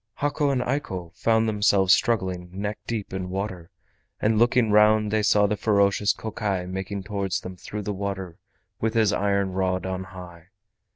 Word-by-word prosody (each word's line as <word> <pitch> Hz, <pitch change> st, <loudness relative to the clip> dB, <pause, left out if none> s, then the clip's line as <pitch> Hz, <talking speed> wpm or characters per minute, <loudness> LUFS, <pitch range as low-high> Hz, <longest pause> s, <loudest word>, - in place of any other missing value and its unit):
Hako 145 Hz, 0 st, 0 dB
and 130 Hz, -2 st, +1 dB
Eiko 95 Hz, -, -3 dB
found 115 Hz, 0 st, +2 dB
themselves 100 Hz, -3 st, +4 dB
struggling 95 Hz, -8 st, 0 dB
neck 105 Hz, +3 st, -4 dB
deep 110 Hz, -5 st, -4 dB
in 95 Hz, -1 st, -4 dB
water, 95 Hz, -3 st, -4 dB, 0.5 s
and 110 Hz, 0 st, +2 dB
looking 120 Hz, -2 st, +3 dB
round 105 Hz, 0 st, +4 dB
they 110 Hz, 0 st, +2 dB
saw 105 Hz, 0 st, +4 dB
the 105 Hz, +1 st, +1 dB
ferocious 100 Hz, 0 st, +2 dB
Kokai 105 Hz, -4 st, -3 dB
making 95 Hz, +2 st, -5 dB
towards 100 Hz, -2 st, -2 dB
them 90 Hz, 0 st, -8 dB
through 105 Hz, +3 st, -7 dB
the 105 Hz, -, -3 dB
water 95 Hz, -2 st, -5 dB, 0.4 s
with 110 Hz, +1 st, -1 dB
his 110 Hz, -2 st, +3 dB
iron 100 Hz, -1 st, +1 dB
rod 95 Hz, -1 st, -1 dB
on 95 Hz, 0 st, -3 dB
high. 90 Hz, -3 st, -11 dB
100 Hz, 165 wpm, -25 LUFS, 95-110 Hz, 0.5 s, themselves